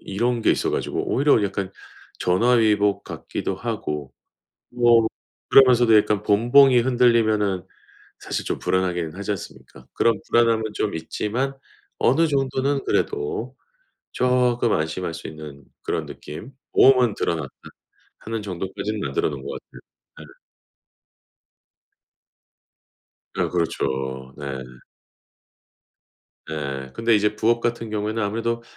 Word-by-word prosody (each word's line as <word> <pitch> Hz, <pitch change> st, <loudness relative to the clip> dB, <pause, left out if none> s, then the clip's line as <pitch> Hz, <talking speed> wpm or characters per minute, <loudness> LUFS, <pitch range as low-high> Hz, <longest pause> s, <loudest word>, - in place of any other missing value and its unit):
이런 120 Hz, +4 st, -1 dB
게 -, -, +4 dB
있어 -, -, 0 dB
가지고 -, -, -2 dB
오히려 140 Hz, -5 st, +3 dB
약간 95 Hz, -1 st, -3 dB, 0.5 s
전화위복 105 Hz, 0 st, +2 dB
같기도 -, -, -5 dB
하고 75 Hz, -2 st, -4 dB, 0.6 s
뭐 120 Hz, -2 st, +4 dB, 0.4 s
그러면서도 120 Hz, -4 st, +6 dB
약간 105 Hz, -1 st, +2 dB
본봉이 120 Hz, +5 st, +5 dB
흔들리면은 115 Hz, -6 st, +2 dB, 0.5 s
사실 -, -, -4 dB
좀 -, -, -3 dB
불안하긴 90 Hz, -3 st, -1 dB
하지 100 Hz, +2 st, -5 dB
않습니까? 65 Hz, -9 st, -10 dB
그런 115 Hz, -3 st, +1 dB
불안함은 115 Hz, -1 st, +3 dB
좀 105 Hz, -, -2 dB
있지만 110 Hz, +11 st, -3 dB, 0.4 s
어느 165 Hz, +1 st, +3 dB
정도는 135 Hz, -1 st, 0 dB
그래도 420 Hz, 0 st, -2 dB, 0.6 s
쪼끔 125 Hz, -2 st, +2 dB
안심할 80 Hz, +2 st, -2 dB
수 85 Hz, -, -8 dB
있는 75 Hz, -2 st, -10 dB, 0.2 s
그런 -, -, -2 dB
느낌. 105 Hz, -, -9 dB, 0.2 s
보험은 125 Hz, -4 st, +5 dB
들어놨다 85 Hz, -2 st, -2 dB, 0.7 s
하는 115 Hz, -1 st, -5 dB
정도까지는 95 Hz, +3 st, -4 dB
만들어 70 Hz, -7 st, -1 dB
놓은 70 Hz, -2 st, -7 dB
것 -, -, -7 dB
같아요. -, -, -16 dB, 0.5 s
네. -, -, -20 dB, 3.0 s
네 -, -, +1 dB
그렇죠. 65 Hz, -6 st, -2 dB
네. 75 Hz, -, -8 dB, 2.1 s
예. 70 Hz, -4 st, -4 dB
근데 115 Hz, 0 st, +2 dB
이제 105 Hz, 0 st, +1 dB
부업 115 Hz, +2 st, +2 dB
같은 115 Hz, -1 st, -2 dB
경우에는 110 Hz, +1 st, -2 dB
아무래도 115 Hz, +3 st, -2 dB
110 Hz, 265 characters per minute, -23 LUFS, 90-120 Hz, 3.0 s, 그러면서도